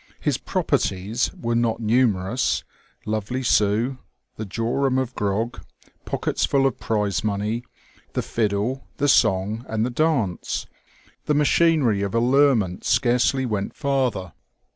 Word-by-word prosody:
His - - 0
"properties" 100 +6 0
were 115 0 -1
not 115 -1 +1
numerous: 115 -1 +1 0.4
lovely 110 +4 -2
Sue, 115 +4 +2 0.4
the 110 - -6
jorum 125 +6 0
of 130 -1 -1
grog, 105 +3 -2 0.4
pockets - - -2
full 135 -1 +2
of 135 - 0
prize 105 0 -1
money, 105 +3 -1 0.5
the - - -1
fiddle, 110 +4 -1
the 145 - +1
song, 105 -2 +2
and 110 0 0
the 125 - -2
dance 130 - 0 0.3
— - - -31
the 150 - +2
machinery 150 -7 +3
of 100 +1 -2
allurement 120 -6 +3
scarcely 125 +2 +2
went 105 -4 -3
farther. 130 - -1
115 Hz, 125 wpm, -23 LUFS, 105-130 Hz, 0.5 s, machinery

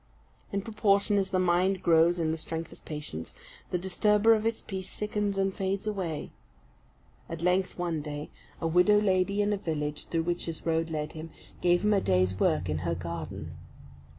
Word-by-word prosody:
In 200 -1 -1
proportion 205 -2 +2
as 190 -1 -1
the 185 - 0
mind 185 +1 +2
grows 170 +1 +5
in 160 -2 0
the - - 0
strength 160 +1 -5
of - - -15
patience, 150 -1 -6 0.3
the 180 - 0
disturber 210 +4 +3
of 220 0 +1
its 225 - -2
peace 190 -2 -5
sickens 210 -1 -1
and 195 0 +1
fades 195 +2 -2
away. 185 -7 -3 1.0
At 165 0 -5
length, 180 +1 +1
one 170 -3 -1
day, 145 0 -6 0.3
a - - -3
widow 180 +5 +5
lady 200 0 +2
in 205 +1 +1
a - - 0
village 150 -5 -3
through 165 -1 0
which 175 +1 -1
his 165 -1 -5
road 165 0 +1
led 150 -1 -3
him, 160 +1 -8 0.3
gave 175 +1 +3
him 210 0 +4
a 200 - +3
day's 95 0 +2
work - - +2
in 75 +1 -1
her 85 0 -1
garden. 85 -1 -6
175 Hz, 185 wpm, -29 LUFS, 155-200 Hz, 1.0 s, grows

